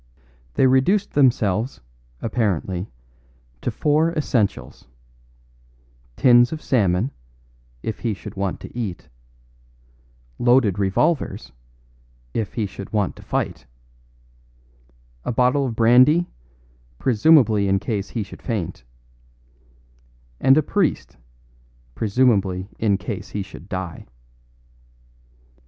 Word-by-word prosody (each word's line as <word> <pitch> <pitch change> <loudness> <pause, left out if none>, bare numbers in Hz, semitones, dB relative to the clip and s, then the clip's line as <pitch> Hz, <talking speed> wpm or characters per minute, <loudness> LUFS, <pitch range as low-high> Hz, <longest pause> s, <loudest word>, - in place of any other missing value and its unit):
They - - +4
reduced 135 +11 +3
themselves, 120 - +1 0.4
apparently, 100 -5 -1 0.7
to - - -1
four 155 +3 +1
essentials: 120 - -2 1.3
tins 120 -1 +5
of 160 - -4
salmon, 105 - +1 0.7
if 110 - -4
he 115 -4 -2
should - - -10
want 95 -1 -2
to - - -11
eat; 110 -8 -5 1.3
loaded 120 -5 +3
revolvers, 100 - 0 0.8
if 110 - -3
he 110 -3 0
should 100 0 -9
want 105 -4 0
to - - -12
fight; - - -3 1.6
a - - -2
bottle 125 +3 +2
of 115 - -4
brandy, 130 +9 +5 0.7
presumably 115 - +4
in 95 0 +3
case 100 0 -3
he 115 - -3
should - - -12
faint; 90 - -4 1.6
and 135 +2 +5
a 155 - +3
priest, 180 - -1 0.8
presumably 100 - +1
in 105 -3 +2
case 100 0 -6
he 100 - -3
should 95 -1 -13
die. 95 -3 -5
110 Hz, 100 wpm, -22 LUFS, 100-130 Hz, 1.6 s, tins